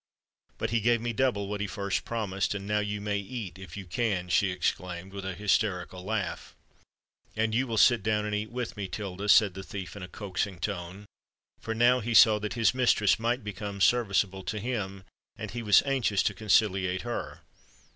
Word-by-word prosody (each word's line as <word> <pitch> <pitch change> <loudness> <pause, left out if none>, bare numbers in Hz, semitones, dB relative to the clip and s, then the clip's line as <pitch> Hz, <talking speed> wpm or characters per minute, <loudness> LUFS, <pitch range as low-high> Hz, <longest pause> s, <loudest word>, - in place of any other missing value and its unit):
But - - -2
he 115 -1 +1
gave 120 +2 +3
me 120 +1 -3
double 105 -4 0
what 100 0 -4
he 105 - -1
first 100 -1 -2
promised; 105 -4 -2
and 100 -1 -5
now 105 +1 +1
you 105 0 -2
may 105 0 -1
eat—if 95 -5 -7
you 100 - -7
can," 90 -1 -1
she 95 +2 +3
exclaimed, 90 +1 -3
with 100 -1 -6
a 95 -1 -4
hysterical 95 -2 0
laugh. 110 0 -3 0.8
"And 110 0 0
you 130 +4 +1
will 115 -2 -2
sit 115 +1 +5
down 105 0 0
and 105 - -3
eat 105 +1 -2
with 120 -2 -4
me, 100 -3 -4
Tilda," 100 0 -5
said 100 -1 +6
the 95 - -7
thief 95 -2 -7
in 100 - -8
a 90 - -6
coaxing 95 0 -4
tone—for 100 +3 -7
he - - -7
now 125 +1 +5
saw 110 -1 +7
that 105 0 -4
his 115 -3 +3
mistress 120 -6 +3
might 120 +1 0
become 100 -1 -6
serviceable 100 -4 +2
to 110 - -3
him, 100 -5 -4 0.3
and - - -6
he 120 - -4
was 105 -4 +5
anxious 130 -8 +1
to 100 - +1
conciliate 95 -3 +1
her. 120 0 -5
105 Hz, 190 wpm, -28 LUFS, 95-110 Hz, 0.8 s, saw